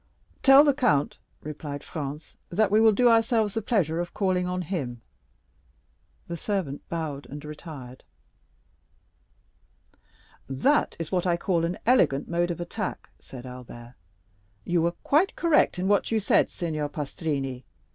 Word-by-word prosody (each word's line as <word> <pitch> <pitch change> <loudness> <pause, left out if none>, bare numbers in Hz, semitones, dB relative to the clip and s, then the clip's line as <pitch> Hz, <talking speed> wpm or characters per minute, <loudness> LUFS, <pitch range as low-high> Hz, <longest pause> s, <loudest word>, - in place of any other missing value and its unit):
"Tell 270 +1 +8
the 290 -2 +4
count," 240 - +1 0.2
replied 145 -1 -6
Franz, 150 0 -6
"that 200 +2 +1
we 215 +1 +5
will 225 -1 +7
do 245 +4 +3
ourselves 225 -2 +3
the 225 - -1
pleasure 180 -7 0
of 175 0 -4
calling 185 -2 +1
on 180 0 -2
him." 140 -9 -4 1.3
The 170 - -4
servant 175 -8 -3
bowed 155 -4 -4
and 145 +2 -9
retired. 150 -5 -9 2.5
"That 205 - +2
is 165 -2 -5
what 180 -1 0
I 170 -1 +2
call 170 -2 0
an 175 +2 -3
elegant 210 - +3
mode 175 +1 0
of 175 - -3
attack," 185 +4 -5
said 130 -1 -11
Albert, 125 -1 -10 0.7
"You 175 -1 +1
were 170 +1 +1
quite 315 +7 +2
correct 330 - +3
in 185 +1 -1
what 205 0 +2
you 225 - +1
said, 205 - +3
Signor 155 -4 -3
Pastrini. 140 -3 -3
170 Hz, 145 wpm, -26 LUFS, 145-205 Hz, 2.5 s, Tell